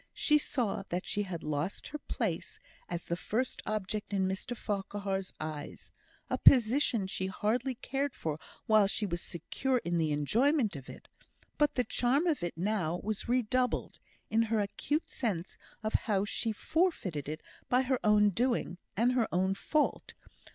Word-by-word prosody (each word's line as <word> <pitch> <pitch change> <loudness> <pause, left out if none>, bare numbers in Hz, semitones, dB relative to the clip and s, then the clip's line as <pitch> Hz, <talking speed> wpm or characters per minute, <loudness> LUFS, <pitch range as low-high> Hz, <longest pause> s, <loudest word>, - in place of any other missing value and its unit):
She 300 -1 +4
saw 245 -7 -1
that 180 +2 -2
she 205 - 0
had 185 -5 -4
lost 150 +5 -2
her 300 - -5
place 215 - -3 0.3
as 175 -1 -4
the 170 - -1
first 235 +8 -1
object 210 0 -2
in 190 -2 +2
Mr 195 +5 -3
Farquhar's 195 -2 -2
eyes 155 -2 -6 0.4
a - - -1
position 240 -3 +5
she 190 0 -2
had 190 - -6
hardly 245 +6 0
cared 275 +3 -2
for 155 -1 -3 0.3
while 215 -2 +5
she 210 +1 -1
was 175 -3 -2
secure 250 - -1
in 175 0 +1
the 160 -2 +1
enjoyment 225 - +2
of 135 -2 -8
it; - - -11 0.5
but 295 -1 +3
the 250 - +2
charm 255 +7 +2
of 315 - +1
it 175 -2 -3
now 180 -3 0
was 215 +2 -2
redoubled, 250 +1 +1 0.3
in 225 - +4
her 225 -1 +1
acute 290 +10 -1
sense 195 -9 -3 0.2
of 215 - -1
how 205 -3 +1
she 225 +2 -1
had 220 - -2
forfeited 310 - 0
it 155 +1 -4 0.3
by 250 +1 +4
her 260 -1 +1
own 210 -1 +5
doing, 230 -5 0 0.2
and 235 +3 +4
her 250 -3 +2
own 190 +2 +2
fault. 300 +9 0
210 Hz, 170 wpm, -32 LUFS, 180-250 Hz, 0.5 s, position